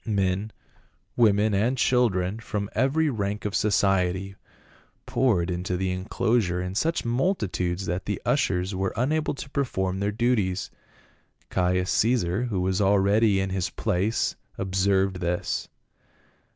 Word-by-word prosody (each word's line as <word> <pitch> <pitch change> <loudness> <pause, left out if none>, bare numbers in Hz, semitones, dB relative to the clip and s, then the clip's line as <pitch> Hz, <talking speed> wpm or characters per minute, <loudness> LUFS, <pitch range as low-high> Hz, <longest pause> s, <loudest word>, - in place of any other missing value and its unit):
Men, 100 -1 -1 0.6
women 105 -2 +3
and 115 +7 +1
children, 110 -6 +1
from 105 -2 -4
every 150 +5 +2
rank 105 -2 -3
of 105 - -2
society 95 -2 +1 0.7
poured 95 -9 +1
into 90 +1 -2
the 95 0 -1
enclosure 95 0 0
in 90 +1 -3
such 165 - 0
multitudes 105 - -1
that 90 +1 -3
the - - -2
ushers 90 +2 +1
were 95 0 -1
unable 150 +6 0
to 140 - -8
perform 95 -10 -1
their 100 +1 0
duties. 105 -5 0 0.8
Caius 90 0 +1
Caesar, 110 -2 +1
who 100 -7 -2
was 95 +2 0
already 100 +1 +3
in 95 0 -1
his 95 -2 -1
place 100 +6 0 0.2
observed 95 0 +1
this. 90 0 -2
100 Hz, 125 wpm, -25 LUFS, 95-115 Hz, 0.8 s, women